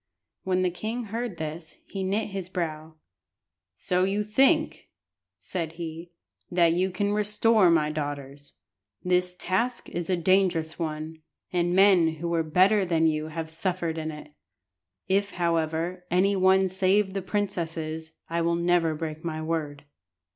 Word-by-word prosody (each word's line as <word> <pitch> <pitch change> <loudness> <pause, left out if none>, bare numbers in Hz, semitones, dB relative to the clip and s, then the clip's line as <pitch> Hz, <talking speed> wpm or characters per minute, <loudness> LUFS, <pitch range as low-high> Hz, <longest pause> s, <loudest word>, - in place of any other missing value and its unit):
When 185 -1 0
the 180 -1 +1
king 220 +7 -4
heard 225 -2 -4
this 160 +1 -6
he 195 -1 -5
knit 205 +4 -1
his 190 -2 -5
brow 160 -3 -4 0.8
"So 180 0 0
you 200 +2 +1
think," 270 +9 +2 0.5
said 165 -3 -4
he, 165 0 -7 0.4
"that 170 -2 +3
you 185 +2 +1
can 200 +3 -1
restore 210 -1 +3
my 155 -2 +3
daughters. 145 -2 -5 0.5
The 180 0 +4 0.2
task 230 +9 -1
is 175 0 -4
a 185 - +2
dangerous 170 -3 +1
one, 160 0 -4 0.3
and 175 0 +1
men 185 -4 +5
who 170 +2 -4
were 170 -1 +1
better 185 +6 +3
than 165 -3 +1
you 155 -1 +1
have 160 0 -5
suffered 170 -1 -2
in 155 0 -3
it. 150 -1 -10 0.7
If, 200 +2 +1
however, 170 +1 -1
any 195 +3 +3
one 190 0 +4
save 190 +1 +1
the 195 - -2
princesses 165 -5 -3
I 170 +1 -1
will 170 0 +1
never 170 -2 +2
break 155 0 -5
my 160 -2 -3
word." 150 -3 -3
175 Hz, 145 wpm, -26 LUFS, 160-190 Hz, 0.8 s, men